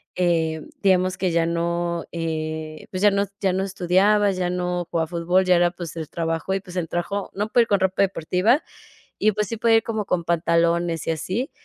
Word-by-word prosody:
eh, 165 -3 +1 0.2
digamos 185 -1 +3
que 185 -3 0
ya 165 0 +2
no, 170 0 -1
eh, 155 -1 -4
pues 185 0 -4
ya 205 - +6
no 200 0 +1 0.2
ya 190 -2 +2
no 190 +1 0
estudiaba, 195 +2 +2
ya 180 -2 -1
no 180 -1 -2
jugaba 165 -1 0
fútbol, 175 +2 +1
ya 185 -1 +4
era 175 0 +3
pues 170 -2 -8
el 160 -2 -5
trabajo 165 +2 -2
y 195 - 0
pues 185 -2 -12
el 175 -3 -1
trabajo, 190 +4 -3
no 210 +2 -2
puede 240 - +5
ir - - -7
con 200 - +2
ropa 190 +1 +2
deportiva 195 - +1 0.6
y 215 - +4
pues 210 0 -1
sí 230 - -4
puede 225 0 +4
ir - - +1
como 220 -3 -3
con 180 -3 0
pantalones 170 0 +1
y - - +2
así, 190 - -3
180 Hz, 210 wpm, -23 LUFS, 170-195 Hz, 0.6 s, ya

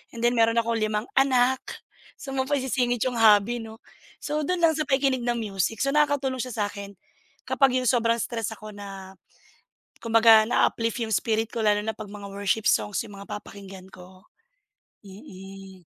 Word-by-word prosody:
and 230 - -6
then 240 - +4
meron 230 -1 +2
akong 230 0 0
limang 215 0 -1 0.2
anak, 260 -1 +3 0.6
so 270 - -9
saan 265 - -3
mo 260 - -1
pa 290 - +1
isisingit 250 -3 0
yung 250 -3 -2
hobby, 220 +2 +4
'no? 225 +1 -11 0.4
So, 300 0 -2
dun 360 -2 -1
lang 325 - +6
sa 305 - -1
pakikinig 265 -3 +1
ng 240 - +1
music. 210 - -2
So, 275 - 0
nakakatulong 285 -3 +1
siya 250 -1 -4
sa 210 - 0
akin 200 -1 -9 0.5
kapag 270 -2 +2
yung 255 0 0
sobrang 230 -2 +2
stress 225 -3 -3
ako 215 0 -11
na, 195 -2 -10 0.9
kumbaga 225 -1 +5
naa-uplift 230 0 0
yung 220 - -5
spirit 225 +1 0
ko, 230 - -5
lalo 210 -1 +2
na 220 - -2
'pag 215 -1 -10
mga 200 -1 -9
worship 200 +2 -1
songs 210 +1 +1
yung 205 -3 -11
mga 200 - -11
papakinggan 195 -2 -11
ko. 185 +1 -15 0.8
Mm. 195 -1 -12
225 Hz, 180 wpm, -25 LUFS, 205-255 Hz, 0.9 s, lang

